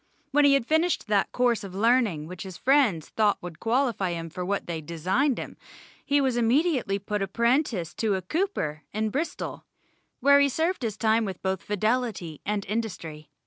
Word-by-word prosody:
When 290 +1 +4
he 280 -1 +6
had 275 - +1
finished 320 +5 +1
that 205 -2 +2
course 240 -3 +1
of 190 -2 -8
learning 220 -7 +2
which 180 +2 -9
his 190 -3 -7
friends 255 - +2
thought 210 -2 +2
would 175 -2 -9
qualify 230 -6 0
him 165 -1 -5
for 180 +2 -5
what 200 +2 -2
they 165 -2 -4
designed 185 - 0
him, - - -7 0.5
he 285 0 +2
was 260 -3 +1
immediately 245 - +2
put 205 +1 -3
apprentice 235 - 0
to 215 -3 +1
a 190 - -3
cooper 185 - -2
in 215 +1 -1
Bristol, 310 +8 -3 0.6
where 280 +2 +6
he 280 0 +4
served 325 +6 -1
his 220 -4 -3
time 225 0 +2
with 190 -4 -5
both 190 -2 -1
fidelity 210 - -1
and 205 -1 -1
industry. 180 -9 -4
215 Hz, 180 wpm, -26 LUFS, 185-260 Hz, 0.6 s, he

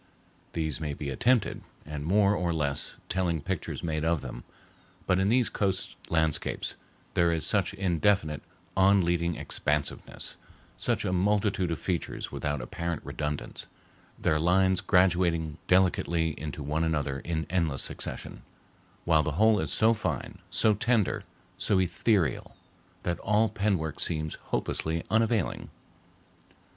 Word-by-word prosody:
These 80 -4 -2
may 75 -2 -2
be 70 -1 -4
attempted, 120 - +2 0.2
and 75 -1 -5
more 100 +5 +4
or 90 -2 0
less 75 -4 -2
telling 90 -3 0
pictures 90 +4 -4
made 80 -2 -1
of 80 -2 +1
them; - - -7 0.6
but 90 - +2
in 95 - +2
these 120 +2 +3
coast 95 -2 0
landscapes 80 -2 0 0.4
there 85 -1 +3
is 80 -2 0
such 100 -1 +1
indefinite, 85 -4 +1 0.3
on 95 -1 +5
leading 85 -1 +1
expansiveness, 75 0 -3 0.4
such - - -1
a 90 - 0
multitude 100 -1 +1
of 85 - -1
features 90 0 -3
without 75 -2 -2
apparent 85 +5 -4
redundance, 75 -1 -4 0.5
their 75 - +1
lines 95 +3 +3
graduating 85 -4 +2
delicately 85 -3 +3
into 75 -1 -5
one 75 +3 0
another 75 -4 0
in 80 +1 -2
endless 80 -7 +1
succession, - - -5 0.6
while 80 -2 +5
the 75 0 -2
whole 110 +5 +4
is 80 -4 -2
so 110 +1 +4
fine, 110 - -3
so 110 - +4
tender, 110 0 +1 0.3
so 100 - +2
ethereal, 90 - +1 0.5
that 85 -1 -1
all 105 +2 +2
pen 100 -1 +1
work 80 -1 -4
seems 80 -1 -1 0.2
hopelessly 80 +1 -1
unavailing. 110 -3 +1
85 Hz, 135 wpm, -28 LUFS, 80-95 Hz, 0.6 s, on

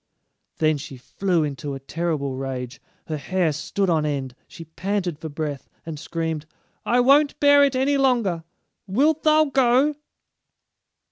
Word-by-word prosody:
Then 155 -1 +2
she 135 -1 -9
flew 175 +6 -1
into 145 -1 -4
a - - -7
terrible 150 -1 -2
rage. 130 -1 -5 0.2
Her 155 - -3
hair 170 +3 0
stood 190 +6 -2
on 160 -3 +2
end; 140 -4 -2
she 165 - -11
panted 180 0 -3
for 160 - -6
breath, 145 -2 -5 0.2
and 160 -3 -6
screamed: 160 -1 -4 0.4
"I 235 +3 +2
won't 280 +4 +4
bear 285 0 +6
it 275 -2 +2
any 275 +2 +2
longer; 235 -11 +1 0.4
wilt 290 +10 +2
thou 310 0 +4
go?" 270 +1 +3
170 Hz, 145 wpm, -23 LUFS, -, 0.4 s, bear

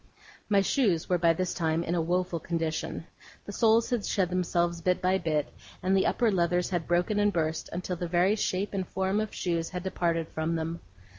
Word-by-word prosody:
My 200 -2 +4
shoes 195 - +1
were 180 -1 +2
by 165 0 +4
this 185 +2 -2
time 160 0 0
in 170 - -2
a 175 - +1
woeful 180 +1 0
condition. 165 -1 -3 0.4
The - - -6
soles 225 +3 +3
had 240 -4 0
shed 190 -3 0
themselves 175 -1 0
bit 180 +2 +1
by 185 +1 +2
bit, 155 -4 -1 0.3
and 190 +1 +2
the 190 - +3
upper 235 -3 +2
leathers 180 0 +1
had 175 -3 -1
broken 175 +4 +1
and 205 0 +3
burst 160 -3 -2
until 180 +1 -3
the 175 - -3
very 180 +4 +3
shape 200 -1 -1
and 190 -2 -2
form 190 +2 0
of 215 - -4
shoes 170 -2 -2
had 180 -1 -5
departed 170 -3 -1
from 160 +1 -2
them. 165 +1 -3
180 Hz, 205 wpm, -28 LUFS, 165-190 Hz, 0.4 s, My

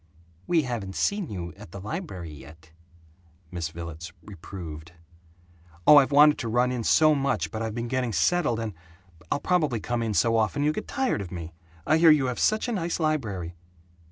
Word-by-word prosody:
"We 165 -3 +3
haven't 115 -7 -4
seen 200 -5 -1
you 85 -4 -6
at - - -12
the 100 - -9
library 100 - -6
yet," 80 +3 -14 0.8
Miss 85 -3 -3
Villets 85 0 -8
reproved. 85 -4 -9 0.9
"I've 145 -2 +7
wanted 150 +1 +6
to 115 - -3
run 120 +2 +2
in 125 -2 -3
so 155 +6 +5
much 135 -2 -1
but 110 -1 -4
I've 110 -1 -3
been 120 0 -3
getting 125 -1 -1
settled 120 - +1
and 110 -2 -4 0.6
I'll - - +1
probably 155 -10 +1
come 120 +3 -2
in 110 -3 -2
so 115 +2 +3
often 110 +6 0
you'll 150 +1 +2
get - - -5
tired 265 - -1
of 95 - -8
me! 85 -2 -7 0.3
I 155 - +3
hear 165 0 +7
you 150 -3 +5
have 125 -1 -3
such 215 +3 +1
a - - -2
nice 175 -6 -2
library." 110 - -2
115 Hz, 185 wpm, -26 LUFS, 90-150 Hz, 0.9 s, I've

